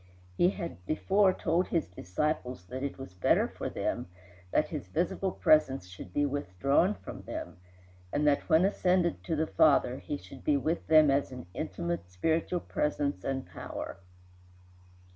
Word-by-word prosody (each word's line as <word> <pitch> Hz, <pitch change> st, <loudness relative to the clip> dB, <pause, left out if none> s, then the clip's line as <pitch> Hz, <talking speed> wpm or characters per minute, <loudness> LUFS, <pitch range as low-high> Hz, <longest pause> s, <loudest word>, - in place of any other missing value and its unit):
He 175 Hz, -, +4 dB
had 85 Hz, -, -6 dB
before 195 Hz, +5 st, +3 dB
told 175 Hz, 0 st, 0 dB
his 165 Hz, -, 0 dB
disciples 125 Hz, -, -3 dB
that 130 Hz, +8 st, -6 dB
it 140 Hz, 0 st, -3 dB
was 135 Hz, -9 st, -9 dB
better 90 Hz, -, +3 dB
for -, -, -5 dB
them -, -, -2 dB, 0.4 s
that -, -, +1 dB
his -, -, -5 dB
visible 185 Hz, -, -1 dB
presence 135 Hz, -, +3 dB
should 90 Hz, 0 st, -10 dB
be 145 Hz, +9 st, +1 dB
withdrawn 140 Hz, -, +1 dB
from -, -, -9 dB
them, -, -, -6 dB, 0.5 s
and 150 Hz, -, +1 dB
that 145 Hz, -1 st, +2 dB
when 160 Hz, +4 st, +5 dB
ascended 180 Hz, -3 st, +1 dB
to 165 Hz, -, 0 dB
the 155 Hz, +1 st, +1 dB
Father 140 Hz, -5 st, +3 dB
he 145 Hz, -, -4 dB
should 135 Hz, -2 st, -13 dB
be 150 Hz, -2 st, +3 dB
with 155 Hz, +5 st, -1 dB
them 155 Hz, -2 st, +7 dB
as 140 Hz, 0 st, +1 dB
an 125 Hz, -5 st, -8 dB
intimate 85 Hz, -2 st, -3 dB
spiritual 160 Hz, -, 0 dB
presence 145 Hz, -8 st, -1 dB
and 135 Hz, -1 st, -2 dB
power. -, -, -7 dB
145 Hz, 160 wpm, -30 LUFS, 120-165 Hz, 0.5 s, them